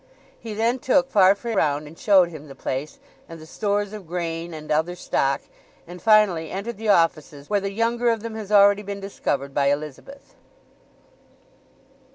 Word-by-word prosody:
He 220 -2 -7
then 230 +4 0
took 265 +1 +2
Farfrae 200 +4 +3
round 150 -6 0
and 150 +2 -12
showed 190 -2 +4
him 155 -3 -10
the 135 - -11
place, 135 +3 -4 0.3
and 165 0 -9
the 155 - -12
stores 205 +3 -2
of 205 -5 -9
grain, 170 0 -4
and 155 -1 -8
other 160 +4 0
stock; 140 -5 -1 0.4
and 175 +1 -11
finally 210 -8 +3
entered 200 +4 -5
the 220 0 -3
offices 155 -5 +1
where 205 -1 +2
the 195 - -2
younger 235 +3 0
of 225 -2 -1
them 230 -1 -5
has 215 -2 -7
already 205 0 +6
been 200 -1 -6
discovered 140 -8 -3
by 140 0 +1
Elizabeth. 150 - -4
195 Hz, 170 wpm, -23 LUFS, 155-215 Hz, 0.4 s, already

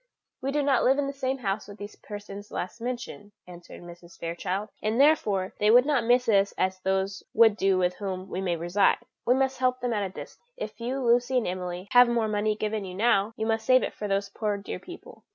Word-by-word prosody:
"We 270 - -2
do 290 0 0
not 275 -3 +2
live 265 +2 +4
in 285 - 0
the 275 - -4
same 265 -1 -2
house 205 -4 -3
with 205 0 -11
these 205 0 -9
persons 205 0 -9
last 185 +6 -5
mentioned," 240 -4 -6
answered 175 -1 -12
Mrs. 175 0 -13
Fairchild, 180 +5 -3
"and 215 +3 -1
therefore 210 -11 +3
they 210 - +3
would 245 +3 +7
not 290 -4 +1
miss 245 +2 +3
us 200 -2 +3
as 185 0 0
those 190 +1 -1
would 225 -2 +6
do 195 -2 +2
with 180 -1 0
whom 190 -2 -5
we 185 - -4
may 180 -3 0
reside; 175 +4 +2 0.3
we 250 - +5
must 265 -1 0
help 255 0 +1
them 245 -1 -1
at 210 - 0
a 195 - -2
distance. 185 - -10 0.2
If - - -7
you, 255 +2 -2
Lucy 245 +2 +3
and 245 - +1
Emily, 180 +1 -4
have 245 -1 +7
more 235 -2 +1
money 210 0 0
given 215 0 -2
you 185 -1 -7
now, 215 0 +2
you 220 - -2
must 225 0 0
save 255 +2 +4
it - - -3
for 210 - -5
these 195 0 -1
poor 210 0 -2
dear 200 - -6
people. 355 0 -12
210 Hz, 230 wpm, -27 LUFS, 195-245 Hz, 0.3 s, would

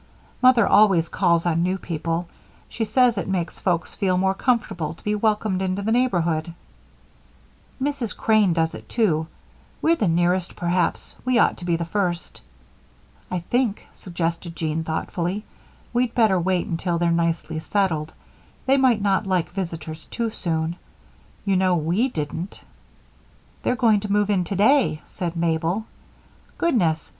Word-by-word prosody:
Mother 255 -2 +6
always 195 -6 +4
calls 170 -3 +2
on 165 -1 +1
new 185 +2 +1
people; 165 0 -3 0.4
she 225 - -3
says 235 0 +3
it 175 - -4
makes 180 -3 -2
folks 175 -3 -1
feel 185 -3 +1
more 190 +1 +2
comfortable 195 - -1
to - - -22
be 210 - 0
welcomed 210 -2 0
into 190 +1 -1
the 220 - 0
neighborhood." 170 -9 +1 1.2
"Mrs. 270 -4 -2
Crane 215 -4 +3
does 165 -1 +1
it, - - -10
too. 165 -9 +1 0.5
We're 330 +1 +3
the 215 - 0
nearest, 175 +2 +1
perhaps 175 0 -1
we 255 -1 +2
ought - - +4
to 175 - -8
be 170 -1 +1
the 170 0 -2
first." 175 -1 -2 0.9
"I 180 -1 -2
think," 240 +3 -1
suggested 170 -1 -4
Jean 160 0 -2
thoughtfully, 175 +5 -3 0.5
"we'd 240 -1 0
better 215 -6 +4
wait 180 0 0
until 170 +1 -1
they're 170 0 +1
nicely 165 -1 0
settled; 160 -4 -1 0.5
they 270 +1 +4
might 250 -6 +3
not 195 0 +1
like 180 -3 0
visitors 165 -4 -5
too 230 -2 -2
soon. 165 -3 -2 0.7
You 195 -1 +2
know 185 -1 +3
we 175 - +1
didn't." 165 - -5 1.0
"They're 250 - +1
going 225 -4 +4
to 205 0 -5
move 205 0 +2
in 185 -3 +1
today," 205 - +2
said 175 -2 -5
Mabel. 165 +5 0 0.7
"Goodness! 175 - +1
185 Hz, 150 wpm, -23 LUFS, 170-215 Hz, 1.2 s, Mother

